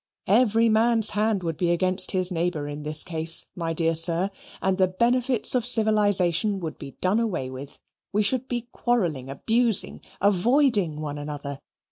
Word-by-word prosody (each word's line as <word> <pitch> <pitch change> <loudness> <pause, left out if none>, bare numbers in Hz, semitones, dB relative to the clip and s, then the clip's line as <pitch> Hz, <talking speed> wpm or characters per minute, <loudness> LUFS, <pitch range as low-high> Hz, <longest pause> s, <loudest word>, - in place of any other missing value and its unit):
Every 225 +2 +3
man's 225 0 +3
hand 210 -2 -1
would 165 -2 -4
be 175 +1 -1
against 185 +2 +1
his 185 0 +2
neighbour 165 -4 -2
in 145 0 -7
this 150 +1 +3
case, 165 -1 +1
my 165 -3 -4
dear 165 0 0
sir, 170 +4 +2 0.3
and 190 0 -1
the 185 - +4
benefits 240 +5 0
of 250 -2 0
civilization 205 -4 +2
would 160 -4 -7
be 140 -2 -10
done 190 +5 +1
away 180 - -3
with. 135 +2 -10 0.3
We 210 +1 +1
should 255 +5 0
be 240 -1 -4
quarrelling, 170 - -2
abusing, 225 - +1 0.2
avoiding 205 - +2
one 145 -1 -5
another. 145 -1 -7
185 Hz, 160 wpm, -24 LUFS, 160-225 Hz, 0.3 s, the